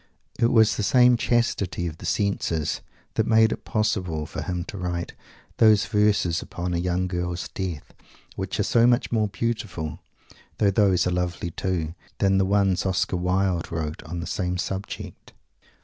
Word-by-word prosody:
It 115 - +4
was 110 -2 +4
the - - -1
same 125 +3 +5
chastity 115 -7 0
of 80 -2 -5
the 85 - -6
senses 85 -7 0 0.3
that - - 0
made 110 0 +5
it - - -5
possible 90 -8 -1
for 80 - -6
him 90 -2 -3
to 100 - -8
write 90 -1 -3 0.4
those 110 -3 +5
verses 105 -5 +2
upon 90 0 -4
a 85 - 0
young 90 +1 0
girl's 90 -1 -3
death, 90 -6 -5 0.4
which - - -4
are - - +3
so 115 0 +4
much 120 0 +2
more 110 -2 +2
beautiful 95 -8 -3 0.6
though 100 -2 +3
those 95 -3 +3
are 90 - +1
lovely 90 -1 -2
too 85 -3 -2 0.2
than 95 -1 +3
the 95 - +3
ones 95 -2 +2
Oscar 95 0 0
Wilde 90 -1 0
wrote 80 -2 -3
on 85 +2 -6
the - - -4
same 90 -2 -2
subject. 95 +2 -6
90 Hz, 165 wpm, -25 LUFS, 85-105 Hz, 0.6 s, same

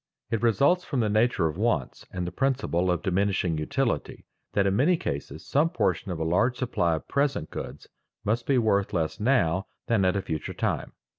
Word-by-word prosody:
It 115 -2 0
results 140 - +3
from 135 -7 -1
the 105 -2 +1
nature 110 -5 +2
of 75 - -5
wants - - -1
and 90 -1 -3
the 90 - -4
principle 125 -7 0
of 90 -2 0
diminishing 95 -4 +1
utility 75 - -2 0.3
that 100 - +2
in 100 0 +2
many 165 - +3
cases 70 - -5
some 150 +4 +2
portion 165 - 0
of 90 - -3
a 80 - -2
large 105 +10 +2
supply 100 -10 +1
of 80 - -7
present 140 - 0
goods - - -7 0.4
must 115 +3 0
be 135 - +3
worth 100 -4 +2
less 80 +2 -1
now 100 -7 +2 0.2
than 110 -4 +2
at 95 0 +2
a 100 - -1
future 80 -2 -4
time. - - -2
100 Hz, 195 wpm, -27 LUFS, 85-125 Hz, 0.4 s, results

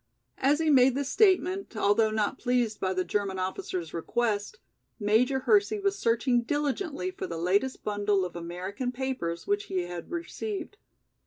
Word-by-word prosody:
As 280 +3 +3
he 320 -1 +2
made 260 -2 +5
this 280 0 -2
statement, 380 - +2
although 215 +2 +3
not 215 +4 -1
pleased 245 -4 0
by 190 - 0
the 185 0 0
German 195 -1 -1
officer's 185 -2 -4
request, 210 - -1 0.4
Major 240 +6 +2
Hersey 415 +4 +3
was 395 0 +1
searching 240 - +2
diligently 290 - -2
for 185 - -6
the 165 - -5
latest 195 +10 0
bundle 205 -2 +1
of 175 - -7
American 180 +8 -4
papers 250 -10 -3
which 405 0 0
he 185 - -1
had 175 -1 -7
received. 380 +3 -5
235 Hz, 155 wpm, -28 LUFS, 190-290 Hz, 0.4 s, made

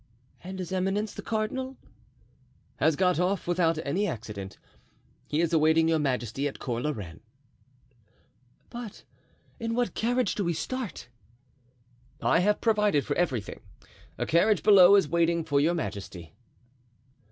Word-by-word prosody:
"And 190 +1 -7
his 185 -1 -6
eminence, 195 +3 -1
the - - -7
cardinal?" 260 +4 -3 1.0
"Has 155 +1 +2
got 180 0 +2
off 185 +2 0
without 170 -2 +1
any 185 +9 0
accident. 100 - -6 0.7
He 150 +2 0
is 170 0 0
awaiting 160 +1 +4
your 165 -1 +2
majesty 135 -1 -1
at 140 - -6
Cours 120 -1 -3
la - - +1
Reine." 95 - -6 1.5
"But 235 -4 -8 0.6
in 230 0 -2
what 245 0 0
carriage 245 -1 0
do 205 - -2
we 170 -1 0
start?" 240 - -5 1.1
"I - - +3
have 205 +3 +1
provided 210 - +2
for - - -2
everything; 130 - -2 0.6
a - - -2
carriage 185 +4 +3
below 200 -2 +8
is 195 -6 +4
waiting 170 +1 +1
for 145 -3 +1
your 165 +4 +2
majesty." 95 - -6
170 Hz, 140 wpm, -27 LUFS, 145-205 Hz, 1.5 s, below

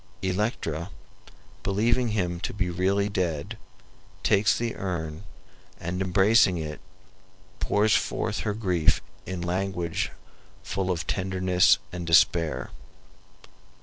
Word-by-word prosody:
Electra, 90 -4 -1 0.7
believing 115 - +1
him 90 -6 -1
to - - -4
be 90 -3 -1
really 95 +3 +1
dead, 85 -7 -2 0.7
takes 105 +1 +3
the 115 -1 -2
urn 85 -3 -4 0.6
and, 85 +2 -3
embracing 95 +1 +4
it, 75 -2 -5 0.8
pours 105 0 +3
forth - - -1
her 105 - -2
grief 90 -7 +2 0.3
in 95 -2 -4
language 90 -1 -1 0.5
full 95 -1 -2
of 90 -2 -1
tenderness 95 -1 +3
and 85 -1 -6
despair. 85 -1 +3
95 Hz, 105 wpm, -26 LUFS, 85-100 Hz, 0.8 s, embracing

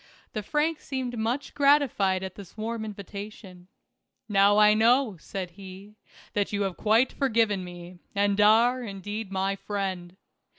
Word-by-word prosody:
The 215 - -2
Frank 300 +8 0
seemed 255 -3 -4
much 235 +5 -2
gratified 275 -10 +3
at 190 -1 -5
this 200 +1 -13
warm 225 +1 -3
invitation. 200 -2 -9 0.6
"Now 200 -1 +4
I 210 0 +7
know," 230 +1 +3
said 180 +2 -6
he, 195 +2 -12 0.4
"that 205 -1 0
you 205 -1 0
have 190 -2 -2
quite 225 +4 +2
forgiven 225 -7 +1
me, 175 0 -10 0.2
and 200 0 +2
are, 230 +4 +5
indeed, 205 -1 -6
my 195 +1 0
friend. 190 -3 -4
205 Hz, 140 wpm, -27 LUFS, 190-230 Hz, 0.6 s, I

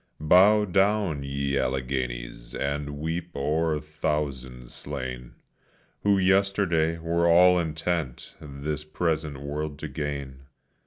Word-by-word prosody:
Bow 100 +7 +5
down, 95 -4 +1
ye 70 0 -1
Alleghenies, 65 -2 -3
and 70 +1 -3
weep 80 +3 -3
o'er 75 +2 0
thousands 70 -5 -4
slain, 65 -3 -6 0.7
Who 100 -1 +3
yesterday 95 -4 +2
were 85 +1 +1
all 90 +1 +6
intent 80 -4 -3
this 75 +1 -5
present 75 -2 -2
world 75 +1 -4
to 80 - -5
gain. 70 -2 -5
75 Hz, 105 wpm, -26 LUFS, 70-85 Hz, 0.7 s, all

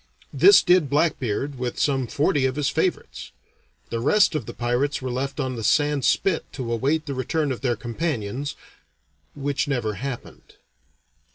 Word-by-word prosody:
This 400 - +7
did 180 -5 +4
Blackbeard 140 -3 0
with 125 -1 -3
some 135 -3 +1
forty 140 -1 +1
of 130 - -3
his 145 -2 0
favorites. 165 +4 -2 0.6
The 115 - -1
rest 185 - +3
of 150 -8 -3
the - - -6
pirates 125 +4 0
were 130 -1 -4
left 135 +3 -3
on 130 -2 -2
the 115 - -5
sand 145 +4 +2
spit 185 -5 +2
to 120 -4 -3
await 145 +7 0
the 140 - -4
return 140 +3 -1
of 125 - -4
their 125 -3 0
companions 125 +1 -3 0.8
which 145 +2 -2
never 120 -6 -1
happened. 135 -3 -7
135 Hz, 160 wpm, -24 LUFS, 125-150 Hz, 0.8 s, This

